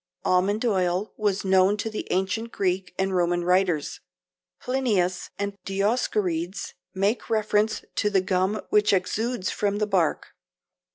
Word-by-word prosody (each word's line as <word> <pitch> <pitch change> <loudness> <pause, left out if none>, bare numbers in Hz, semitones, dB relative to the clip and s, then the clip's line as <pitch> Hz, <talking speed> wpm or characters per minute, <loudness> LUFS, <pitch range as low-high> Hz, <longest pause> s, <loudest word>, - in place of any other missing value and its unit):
Almond 200 +5 +2
oil 185 -2 0
was 205 -2 -1
known 190 +2 +4
to 210 - -3
the 215 -1 -5
ancient 190 +5 -1
Greek 185 -1 -1
and 190 0 0
Roman 175 0 +1
writers. 180 -4 +1 0.6
Plinius 210 -9 0
and 200 0 -3
Dioscorides 195 -3 -1 0.2
make 200 +6 0
reference 215 0 +1
to 210 - +2
the 200 -2 +3
gum 190 +3 0
which 210 -1 +4
exudes 215 +3 -1
from 205 -1 -1
the 210 - +1
bark. 185 -6 0
195 Hz, 130 wpm, -25 LUFS, 185-210 Hz, 0.6 s, known